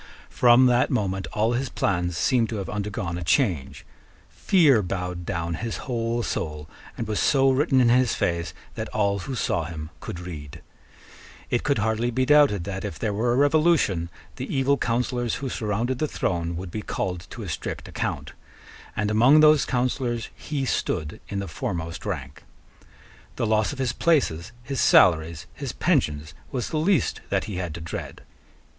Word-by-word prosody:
From 125 Hz, +1 st, +6 dB
that 125 Hz, -1 st, +3 dB
moment 95 Hz, -6 st, -1 dB
all 110 Hz, +3 st, +1 dB
his 130 Hz, +1 st, -1 dB
plans 90 Hz, -6 st, -1 dB
seem 120 Hz, 0 st, +2 dB
to 115 Hz, -, -5 dB
have 100 Hz, -3 st, -4 dB
undergone 100 Hz, -4 st, -3 dB
a -, -, -4 dB
change. 85 Hz, -, 0 dB, 0.5 s
Fear 150 Hz, -, +4 dB
bowed 90 Hz, -2 st, -4 dB
down 85 Hz, -3 st, -2 dB
his 115 Hz, +7 st, -4 dB
whole 120 Hz, -2 st, -1 dB
soul, 75 Hz, -6 st, -4 dB, 0.3 s
and 115 Hz, -, -3 dB
was 105 Hz, -1 st, -1 dB
so 135 Hz, -2 st, +4 dB
written 135 Hz, 0 st, +3 dB
in 120 Hz, -2 st, +5 dB
his 125 Hz, -1 st, +3 dB
face 85 Hz, -1 st, -1 dB, 0.2 s
that 110 Hz, -1 st, -5 dB
all 100 Hz, -2 st, 0 dB
who 130 Hz, +8 st, -5 dB
saw 85 Hz, -7 st, 0 dB
him 80 Hz, -1 st, -7 dB
could 85 Hz, -, -7 dB
read. 80 Hz, -5 st, -8 dB, 0.9 s
It 120 Hz, -, +2 dB
could 140 Hz, -3 st, +1 dB
hardly 110 Hz, +2 st, 0 dB
be 130 Hz, +2 st, 0 dB
doubted 145 Hz, -10 st, +5 dB
that, 95 Hz, 0 st, -5 dB
if 80 Hz, -, -5 dB
there 105 Hz, +2 st, -1 dB
were 115 Hz, +4 st, +1 dB
a -, -, +1 dB
revolution, 145 Hz, -, +3 dB, 0.3 s
the -, -, -5 dB
evil 135 Hz, +1 st, +2 dB
counsellors 120 Hz, -1 st, -1 dB
who 135 Hz, -1 st, -4 dB
surrounded 115 Hz, +4 st, -2 dB
the 155 Hz, -, +1 dB
throne 85 Hz, -, -2 dB
would 90 Hz, +1 st, -6 dB
be 110 Hz, -, -4 dB
called 90 Hz, -4 st, -4 dB
to -, -, -7 dB
a -, -, -6 dB
strict -, -, -5 dB
account: -, -, -4 dB, 0.6 s
and 105 Hz, 0 st, 0 dB
among 125 Hz, +8 st, +6 dB
those 155 Hz, -3 st, +6 dB
counsellors 125 Hz, -2 st, -1 dB
he 145 Hz, -3 st, -3 dB
stood 75 Hz, -10 st, -2 dB
in 100 Hz, -, -3 dB
the 100 Hz, 0 st, -3 dB
foremost 85 Hz, +2 st, -4 dB
rank. 75 Hz, -5 st, -5 dB, 0.9 s
The -, -, -1 dB
loss 110 Hz, -1 st, +2 dB
of 145 Hz, -, -7 dB
his 130 Hz, -3 st, -1 dB
places, 125 Hz, -, +1 dB
his 135 Hz, +2 st, -2 dB
salaries, 80 Hz, -2 st, +4 dB
his -, -, -5 dB
pensions, 75 Hz, +2 st, 0 dB, 0.2 s
was 125 Hz, -3 st, -2 dB
the 155 Hz, -, -2 dB
least 165 Hz, -, +1 dB
that -, -, +1 dB
he 105 Hz, -4 st, -5 dB
had 90 Hz, -4 st, -4 dB
to 85 Hz, -, -7 dB
dread. 85 Hz, -, -7 dB
110 Hz, 175 wpm, -25 LUFS, 85-130 Hz, 0.9 s, From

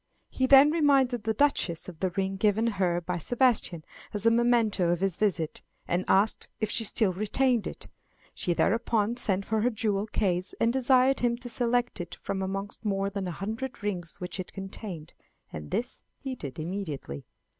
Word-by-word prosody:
He 260 Hz, -, +1 dB
then 275 Hz, +2 st, +8 dB
reminded 270 Hz, -7 st, +2 dB
the 220 Hz, -, +1 dB
Duchess 210 Hz, -, +1 dB
of 175 Hz, -4 st, -10 dB
the 190 Hz, -, +1 dB
ring 190 Hz, +2 st, -2 dB
given 210 Hz, +3 st, +2 dB
her 185 Hz, -6 st, 0 dB
by 175 Hz, 0 st, -3 dB
Sebastian 230 Hz, -, +1 dB, 0.3 s
as 210 Hz, +1 st, -1 dB
a 230 Hz, -, +6 dB
memento 230 Hz, -6 st, +3 dB
of 175 Hz, -1 st, +1 dB
his 195 Hz, -2 st, 0 dB
visit, 180 Hz, -7 st, -1 dB, 0.3 s
and 180 Hz, +2 st, 0 dB
asked 200 Hz, +3 st, +2 dB
if 215 Hz, -1 st, -1 dB
she 230 Hz, -, 0 dB
still 215 Hz, -2 st, +2 dB
retained 230 Hz, +4 st, +1 dB
it. -, -, -8 dB, 0.5 s
She 175 Hz, -2 st, -1 dB
thereupon 225 Hz, +2 st, +1 dB
sent 195 Hz, -4 st, 0 dB
for 220 Hz, -1 st, 0 dB
her 245 Hz, -, +3 dB
jewel 210 Hz, -3 st, -1 dB
case 185 Hz, -4 st, -1 dB
and 230 Hz, +1 st, +2 dB
desired 260 Hz, +1 st, +4 dB
him 240 Hz, -1 st, +1 dB
to 245 Hz, 0 st, -8 dB
select 240 Hz, -3 st, 0 dB
it 175 Hz, -, -7 dB
from 190 Hz, -, -4 dB
amongst 195 Hz, +3 st, -4 dB
more 200 Hz, -1 st, -1 dB
than 195 Hz, -2 st, -3 dB
a -, -, -3 dB
hundred 220 Hz, +7 st, -5 dB
rings 180 Hz, -6 st, -4 dB
which 180 Hz, +1 st, -6 dB
it 185 Hz, -, -6 dB
contained, 195 Hz, -4 st, -7 dB, 0.4 s
and 75 Hz, -1 st, -7 dB
this 245 Hz, +2 st, -3 dB, 0.2 s
he 270 Hz, -2 st, -5 dB
did 140 Hz, -, -7 dB
immediately. 155 Hz, -, -5 dB
205 Hz, 180 wpm, -28 LUFS, 185-240 Hz, 0.5 s, then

